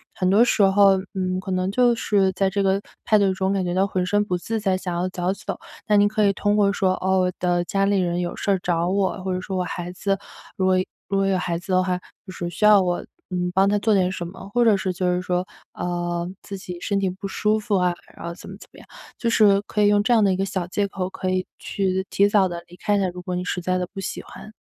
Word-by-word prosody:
很 185 - 0
多 210 +4 +6
时 230 -3 +3
候， 195 0 +5 0.2
嗯， 185 -1 -1
可 190 0 -6
能 185 +1 0
就 245 +2 +4
是 200 -4 +1
在 190 +1 +1
这 200 +1 0
个 195 +1 +2 0.2
派 215 - +4
对 195 -1 +3
中 190 +1 0
感 195 -1 0
觉 175 -1 -2
到 190 +1 +3
浑 185 -2 -1
身 205 +2 +2
不 180 -3 -1
自 220 +5 -3
在 195 -3 +1
想 185 -1 -4
要 175 +2 0
早 180 0 -1
走。 195 - -5 0.3
那 210 - +2
您 205 0 +5
可 210 0 +1
以 200 - +3
通 205 +1 +1
过 200 -1 +3
说： 190 -2 +1
“哦， 190 0 +2
我 180 0 +1
的 175 -1 +1
家 195 +2 0
里 200 -1 +2
人 175 -1 0
有 175 -1 -3
事 195 -2 0
找 170 0 0
我”， 190 -1 0
或 190 - -2
者 185 - -1
说： 190 +1 -5
“我 180 - 0
孩 175 0 -5
子”， 195 +2 -1 0.4
如 190 - +1
果 185 0 +4 0.3
如 200 - -1
果 195 - +2
有 190 -1 +2
孩 175 -2 -2
子 185 - -8
的 185 0 +3
话， 180 -1 -1 0.3
就 185 - -9
是“…… 175 -1 -4
需 210 - 0
要 210 -2 +7
我， 175 -1 -1 0.2
嗯， 180 -1 -1
帮 195 +2 +4
他 205 - +2
做 220 +1 +2
点 185 -2 +2
什 175 -2 -4
么”。 190 +2 -10
或 240 -1 +3
者 220 -3 +5
是 190 -1 -1
就 180 0 -2
是 180 0 +1
说， 180 0 -1 0.3
呃， 175 0 -3
自 200 - -7
己 180 -2 -8
身 200 -2 0
体 195 - 0
不 185 +2 -8
舒 210 +2 +1
服 210 -2 0
啊， 180 -1 +2 0.2
然 - - -10
后 170 - -4
怎 - - -12
么 195 - -9
怎 - - -14
么 - - -14
样。 - - -15 0.3
就 235 - -1
是 205 -3 +5
可 210 0 -2
以 205 - +5
用 205 0 +3
这 240 - +3
样 225 - +5
的 195 - +3
一 - - 0
个 195 - -1
小 190 -2 -3
借 200 +3 0
口， 185 -1 -3
可 185 0 -4
以 185 0 0
去 190 -1 -2
提 200 - +3
早 200 -3 +3
地 170 0 -5
离 175 - -14
开 205 +3 0
的， 195 -2 +1
如 180 - -8
果 180 0 -4
你 180 - -3
实 180 - -2
在 185 +1 0
的 180 -1 -2
不 195 - -5
喜 190 - -4
欢。 215 - -12
190 Hz, 300 characters per minute, -23 LUFS, 180-200 Hz, 0.4 s, 要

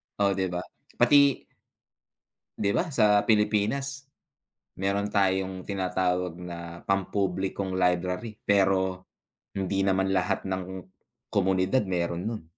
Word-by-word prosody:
Oh, 100 -1 +2
'di 95 -1 0
ba? 90 0 -4 0.3
Pati 140 -2 +4 1.1
'Di 100 -1 +1
ba, 175 - 0
sa 105 -6 +4
Pilipinas, 135 +6 0 0.7
meron 100 +2 -1
tayong 95 -2 0
tinatawag 90 -2 -1
na 90 -1 -7 0.3
pampublikong 95 0 -1
library, 90 +4 0
pero 95 -2 +1 0.4
hindi 95 0 -1
naman 95 0 +1
lahat 95 +1 0
ng 95 0 -2 0.6
komunidad 95 +3 +1
meron 85 -2 -2
no'n. 110 -4 -4
95 Hz, 105 wpm, -27 LUFS, 95-105 Hz, 1.1 s, Pati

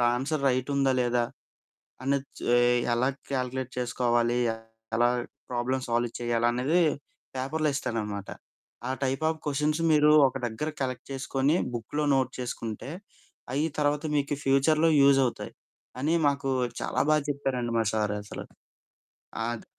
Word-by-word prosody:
Answer 140 +3 -2
రైటుందా, 135 +1 +1
లేదా 120 0 +1 0.8
అని 140 +2 +2 0.2
చ్ - - -11 0.5
ఎలా 125 +2 +2 0.2
కాలిక్యులేట్ 130 0 -2
చేసుకోవాలి, 120 -1 +1 0.6
ఎలాగ 120 +1 +3 0.4
ప్రాబ్లమ్ 125 +2 -1
సాల్వ్ 120 0 0
చేయాలన్నిది 120 +7 +2 0.5
పేపర్‌లో 150 +4 0
ఇస్తాడనమాట. 105 -7 -3 0.6
"ఆ - - -2
టైప్ 135 +2 -1
ఆఫ్ 160 -1 -5
క్వెషన్స్ 150 +2 0
మీరు 150 0 +5 0.2
ఒక 130 - -8
దగ్గర 120 +7 -3
కలెక్ట్ 130 -1 -4
చేసుకొని, 135 +3 +1 0.2
బుక్‌లో 135 +6 -2
నోట్ 130 -1 +1
చేసుకుంటే 120 0 -5 0.6
అయ్యి 150 +4 +1
తర్వాత 145 +1 +1
మీకు 145 0 0
ఫ్యూచర్‌లో 155 +4 +4
యూజ్ 140 0 +6
అవుతాయి." 120 - -5 0.5
అని 150 +4 +1 0.2
మాకు 140 -1 -1 0.3
చాలా - - -2
బాగా 155 -1 +4
చెప్పారండి 130 -4 -2
మా - - +3
సారు 105 -1 0
అసలు. - - -7 1.0
ఆద్ 120 -1 -4
130 Hz, 125 wpm, -28 LUFS, 120-145 Hz, 1.0 s, యూజ్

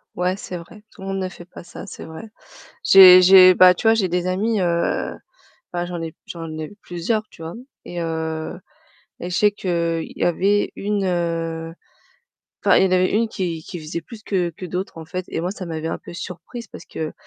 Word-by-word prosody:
Ouais, 180 +1 0
c'est 185 -2 -6
vrai. 190 +5 -13
Tout - - -16
le 190 - -7
monde 195 0 -2
ne 185 - -2
fait 175 - -12
pas 175 - -12
ça, 175 - -10
c'est - - -9
vrai. 160 +7 -9 0.6
J'ai 185 -1 +10
j'ai 185 0 +9
bah, 180 0 +7
tu 200 - -4
vois, 225 - +7
j'ai 205 -5 +1
des 180 +1 -1
amis, 210 +5 0
heu, 170 -1 0 0.6
bah, 175 0 -2
j'en 175 -1 -5
ai 165 -1 -4
p - - -36
j'en 165 -2 -7
ai 155 -1 -5
plusieurs, 180 +6 -2
tu - - -16
vois? 165 +1 -6 0.3
Et 175 -1 -5
heu, 160 0 -3 0.6
et 175 - -6
je 180 - -2
sais 210 - +4
qu'il 170 -4 -2
y - - -6
avait 195 +4 +2
une, 205 -1 -1
heu, 165 -2 -2 0.9
enfin, - - +5
il - - +5
y - - +4
en 185 - -1
avait 185 0 +3
une 230 +2 +2
qui 170 -6 -4
qui 175 - -7
faisait 155 +2 -5
plus 215 +6 -12
que 180 -5 -1
que 170 +3 -10
d'autres, 180 +1 -4
en 165 - -8
fait 180 +3 -5
et - - -3
moi, 175 +2 -2
ça 190 -2 -7
m'avait 160 -1 -4
un - - -3
peu - - -11
surprise 185 +7 -8
parce - - -11
que 155 -1 -5
180 Hz, 220 wpm, -21 LUFS, 165-190 Hz, 0.9 s, J'ai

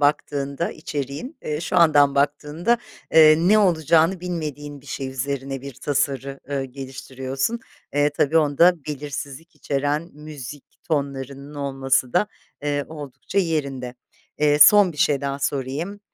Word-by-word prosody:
baktığında 145 +1 0
içeriğin, 150 - -5
eee, 150 +1 -3
şu 180 - -2
andan 145 -5 +5
baktığında, 150 +10 +1 0.3
eee, 155 -1 +8
ne 190 +6 +4
olacağını 170 -1 +3
bilmediğin 150 -5 -5
bir 140 - -20
şey 135 0 -4
üzerine 135 0 -4
bir 140 -2 -8
tasarı, 140 0 -2
ııı, 140 -1 -1
geliştiriyorsun. 135 - -4 0.3
Eee, 145 0 +3
tabii 145 +2 +1
onda 160 +2 +3
belirsizlik 145 +3 -6
içeren 145 +4 -2
müzik 150 -2 -9 0.2
tonlarının 140 -2 -3
olması 135 -2 0
da, 210 - +3 0.4
eee, 145 -1 -1
oldukça 145 +3 -5
yerinde. 140 -8 -1 0.4
Eee, 150 0 +3
son 190 +3 +8
bir - - -15
şey 145 -4 +2
daha 140 0 -3
sorayım 145 +9 -3
145 Hz, 130 wpm, -23 LUFS, 135-160 Hz, 0.4 s, eee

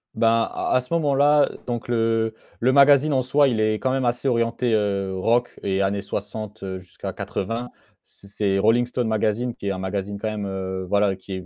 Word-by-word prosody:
Ben, 115 - +2 0.2
à - - -3
à 125 - +3
ce 125 - -15
moment-là, 145 -1 +4
heu, - - -11
donc 120 -1 -3
le 115 -1 +1 0.3
le 125 +2 +3
magazine 140 +1 +6
en 130 - +2
soi, 140 +3 +3
il 120 -4 0
est 110 0 +2
quand 130 +4 -1
même 130 -1 0
assez 120 +3 -1
orienté, 115 -1 +1
heu, 100 -3 0
rock 115 +6 +1
et 95 0 0
années 100 +1 0
60, 105 +1 -6
heu, 95 -1 -4
jusqu'à 90 -2 -8
80. 115 +5 -4 0.3
C 100 - -19
c'est 100 -1 0
Rolling 115 +4 +3
Stone 125 -1 -2
Magazine 110 +2 0
qui 100 - -7
est - - +1
un 95 - -3
magazine 95 +2 -3
quand 110 - -3
même, 105 -2 -4
heu, 95 -1 -4
voilà, 100 -1 +2
qui 95 +1 -10
est, 95 -1 -6
110 Hz, 215 wpm, -23 LUFS, 100-125 Hz, 0.3 s, magazine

